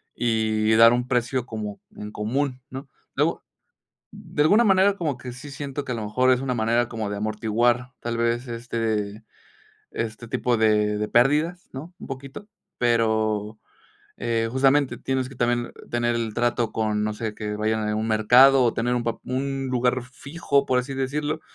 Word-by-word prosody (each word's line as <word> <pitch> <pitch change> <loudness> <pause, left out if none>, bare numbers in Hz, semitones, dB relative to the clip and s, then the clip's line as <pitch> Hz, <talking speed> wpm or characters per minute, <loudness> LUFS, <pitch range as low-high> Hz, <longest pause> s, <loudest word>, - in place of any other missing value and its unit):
y 110 -2 +1
dar 115 +1 +7
un 120 0 -1
precio 125 0 0
como 105 -4 -6 0.2
en 105 0 -7
común, 130 +5 -2
¿no? 135 +2 -8 0.3
Luego - - 0 0.7
de 145 - -2
alguna 210 +10 +5
manera, 195 -1 +4
como 155 -8 -2
que 125 0 -8
sí 125 +4 -10
siento 140 0 -5
que 125 - -2
a - - -2
lo 115 - -4
mejor 125 +5 +2
es 125 - +1
una 135 -2 -1
manera 115 +1 +1
como 110 -3 -4
de 100 - -4
amortiguar, 115 +4 0
tal 115 0 -3
vez, 120 +2 0
este 115 -3 -3 0.7
este 115 0 -5
tipo 120 +1 0
de 105 -1 +2
de 105 0 -2
pérdidas, 150 +8 +2
¿no?, 150 +7 -8
un - - -9
poquito, 135 +9 -8 0.3
pero, 110 -2 +1 0.6
eh, 115 -1 -1
justamente 135 +1 +3
tienes 130 -1 -2
que 135 - -12
también 120 -1 -1 0.2
tener 120 0 0
el 115 -2 -2
trato 120 -1 0
con 105 -1 -1
no 105 0 -1
sé, 110 -1 -4
que 105 -1 -4
vayan 110 0 -1
a 105 - -1
un 110 +1 -1
mercado, 125 +5 +6
o 120 -2 +3
tener 120 +2 0
un 120 - 0
pap 115 -1 -3
un 135 +1 -2
lugar 125 0 +1
fijo, 140 +2 -1
por 125 - +2
así 130 +2 -3
decirlo, 145 +4 -2
120 Hz, 180 wpm, -24 LUFS, 110-130 Hz, 0.7 s, dar